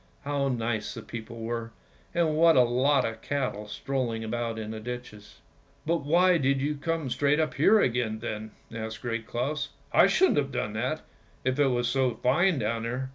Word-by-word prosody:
How 140 Hz, -1 st, 0 dB
nice 115 Hz, -4 st, -2 dB
the -, -, -7 dB
people 115 Hz, 0 st, -8 dB
were, 115 Hz, 0 st, -4 dB, 0.4 s
and 165 Hz, -3 st, +2 dB
what 165 Hz, +1 st, +6 dB
a 125 Hz, -, +7 dB
lot 130 Hz, +3 st, +2 dB
of 115 Hz, 0 st, -4 dB
cattle 130 Hz, -7 st, -2 dB
strolling 115 Hz, 0 st, -2 dB
about 115 Hz, 0 st, -3 dB
in 110 Hz, -1 st, -5 dB
the 110 Hz, -, -5 dB
ditches." 115 Hz, -3 st, -8 dB, 0.2 s
" -, -, -34 dB
But 170 Hz, +2 st, +2 dB
why 170 Hz, +4 st, +3 dB
did 135 Hz, 0 st, +2 dB
you 145 Hz, +3 st, 0 dB
come 155 Hz, -2 st, -2 dB
straight 145 Hz, +3 st, +2 dB
up 155 Hz, -5 st, 0 dB
here 195 Hz, +11 st, +5 dB
again 120 Hz, -, +1 dB
then? 110 Hz, 0 st, -5 dB
" -, -, -19 dB
asked 110 Hz, -1 st, -6 dB
Great 115 Hz, -2 st, -3 dB
Claus. 145 Hz, +5 st, -2 dB
" -, -, -33 dB
I -, -, +7 dB
shouldn't 380 Hz, 0 st, +3 dB
have 140 Hz, -1 st, -2 dB
done 105 Hz, -5 st, -2 dB
that, 130 Hz, +8 st, -2 dB, 0.4 s
if 130 Hz, +2 st, 0 dB
it 145 Hz, -, +5 dB
was 120 Hz, -2 st, +1 dB
so 130 Hz, -2 st, +1 dB
fine 170 Hz, +7 st, +2 dB
down 115 Hz, -1 st, -1 dB
there." 125 Hz, +3 st, -3 dB
125 Hz, 200 wpm, -28 LUFS, 115-145 Hz, 0.4 s, a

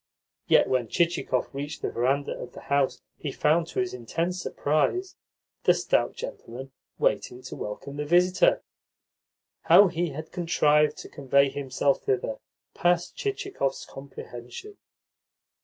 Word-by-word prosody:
Yet -, -, +5 dB
when 125 Hz, -3 st, +1 dB
Chichikov 170 Hz, -5 st, 0 dB
reached 145 Hz, +3 st, -5 dB
the -, -, -1 dB
verandah 135 Hz, +4 st, 0 dB
of 125 Hz, -, -8 dB
the -, -, -10 dB
house 140 Hz, -2 st, +1 dB, 0.2 s
he -, -, -4 dB
found, 160 Hz, +2 st, +2 dB
to -, -, -4 dB
his 185 Hz, -1 st, -1 dB
intense 165 Hz, +10 st, -2 dB
surprise, 155 Hz, -, 0 dB, 0.5 s
the -, -, +6 dB
stout -, -, +1 dB
gentleman 135 Hz, -, -8 dB, 0.3 s
waiting 125 Hz, +1 st, 0 dB
to 130 Hz, -, -7 dB
welcome 120 Hz, +7 st, -6 dB
the 150 Hz, -, -2 dB
visitor. 180 Hz, +4 st, +4 dB, 1.0 s
How 200 Hz, -2 st, +8 dB
he 175 Hz, 0 st, -1 dB
had 155 Hz, +2 st, -7 dB
contrived 150 Hz, -4 st, +2 dB
to -, -, -8 dB
convey 140 Hz, 0 st, +2 dB
himself 140 Hz, 0 st, 0 dB
thither 125 Hz, -4 st, -1 dB, 0.3 s
passed 175 Hz, 0 st, +1 dB
Chichikov's 395 Hz, -, -2 dB
comprehension. 135 Hz, -, -10 dB
145 Hz, 130 wpm, -27 LUFS, 135-175 Hz, 1.0 s, How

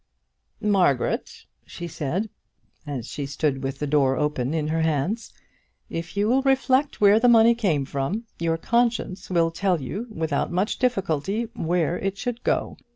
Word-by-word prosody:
"Margaret," 185 Hz, -11 st, +1 dB, 0.2 s
she 175 Hz, -, -7 dB
said, 170 Hz, +7 st, -3 dB, 0.6 s
as 135 Hz, -6 st, -4 dB
she 145 Hz, -2 st, -4 dB
stood 140 Hz, -1 st, -1 dB
with 135 Hz, 0 st, -3 dB
the 150 Hz, -, -2 dB
door 140 Hz, -2 st, +2 dB
open 150 Hz, -4 st, -1 dB
in 155 Hz, -1 st, -1 dB
her 160 Hz, +1 st, 0 dB
hands, 160 Hz, +8 st, -1 dB, 0.6 s
"if 165 Hz, +4 st, -5 dB
you 205 Hz, +1 st, +2 dB
will 260 Hz, +4 st, +3 dB
reflect 270 Hz, +1 st, +2 dB
where 205 Hz, +1 st, +6 dB
the 245 Hz, -, +4 dB
money 230 Hz, 0 st, +7 dB
came 180 Hz, -12 st, 0 dB
from, 140 Hz, -, -2 dB, 0.2 s
your 165 Hz, -1 st, 0 dB
conscience 230 Hz, -2 st, 0 dB
will 170 Hz, -2 st, +2 dB
tell 180 Hz, 0 st, 0 dB
you 195 Hz, -, -5 dB
without 160 Hz, -7 st, -2 dB
much 185 Hz, +5 st, 0 dB
difficulty 200 Hz, -, 0 dB
where 175 Hz, -3 st, 0 dB
it 195 Hz, 0 st, -2 dB
should 240 Hz, +2 st, -4 dB
go -, -, 0 dB
to. -, -, -31 dB
175 Hz, 160 wpm, -24 LUFS, 150-220 Hz, 0.6 s, money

